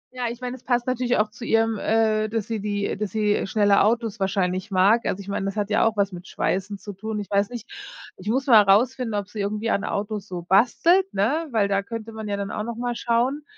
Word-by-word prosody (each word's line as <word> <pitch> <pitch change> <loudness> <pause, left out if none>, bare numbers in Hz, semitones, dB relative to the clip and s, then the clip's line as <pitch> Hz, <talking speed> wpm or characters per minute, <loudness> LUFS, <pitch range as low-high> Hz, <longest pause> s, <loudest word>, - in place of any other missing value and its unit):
Ja, 250 -1 -2
ich 240 +2 -8
mein, 250 0 -4
es 255 - -11
passt 245 -1 0
natürlich 250 -1 0
auch 215 0 +1
zu 225 - -11
ihrem, 225 -1 +1
äh, 215 0 +1
dass 220 -2 -2
sie 225 0 -3
die 205 -1 -2
dass 210 0 -2
sie 210 0 0
schnelle 205 -1 +3
Autos 225 0 +1
wahrscheinlich 190 0 -1
mag, 200 +5 +3
also 190 - -1
ich 195 - -12
mein, 200 - -2
das 195 0 -3
hat 210 0 -2
ja - - +3
auch 220 -1 -2
was 200 -1 +1
mit 180 0 -9
Schweißen 195 +2 -2
zu 205 +1 -9
tun. 215 +3 -5
Ich 205 - -7
weiß 200 0 +2
nicht, 240 -1 -8 0.5
ich 190 +3 -6
muss 260 +4 +1
mal 230 -5 +8
rausfinden, 230 +4 +2
ob 200 -1 -2
sie 210 +1 -9
irgendwie 210 +3 -1
an 200 - 0
Autos 210 0 -3
so 180 -3 -6
bastelt, 295 - +3
ne, 295 +12 +1
weil 220 -5 +1
da 200 0 +1
könnte 225 +2 -7
man 220 -1 -7
ja 200 -1 -2
dann 200 0 -4
auch - - -3
noch 235 +1 -5
mal 240 +1 -2
schauen. 245 +6 0
215 Hz, 250 wpm, -24 LUFS, 200-235 Hz, 0.5 s, mal